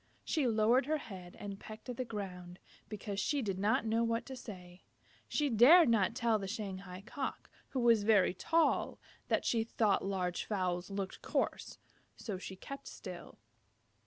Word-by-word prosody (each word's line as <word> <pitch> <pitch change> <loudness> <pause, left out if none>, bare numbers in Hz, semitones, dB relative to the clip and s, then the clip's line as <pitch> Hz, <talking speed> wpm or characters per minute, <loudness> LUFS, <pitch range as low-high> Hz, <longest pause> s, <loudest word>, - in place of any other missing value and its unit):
She 300 -6 +1
lowered 235 +3 +3
her 310 +1 +2
head 185 -10 -9
and 200 -1 -6
pecked 215 +3 -10
at 250 - -4
the 255 - -2
ground, 180 -5 -6 0.3
because 205 -1 -4
she 275 +7 0
did 195 -3 -2
not 210 +3 +2
know 225 +1 +2
what 230 0 0
to 265 - -7
say. 180 -7 -10 0.5
She 295 - +1
dared 270 +7 +7
not 210 -5 +3
tell 230 -2 +2
the 195 - -4
Shanghai 190 -2 -6
Cock, 265 +3 -5 0.2
who 265 - -2
was 230 -3 +5
very 205 -4 +4
tall, 325 - +1 0.3
that - - +1
she 230 -2 +2
thought 220 -3 +1
large 185 -2 -1
fowls 185 -3 -1
looked 195 -1 -4
coarse. - - -2 0.4
So 200 -5 -5
she 190 - -7
kept 275 +8 -9
still. 180 -3 -9
210 Hz, 165 wpm, -34 LUFS, 190-235 Hz, 0.5 s, dared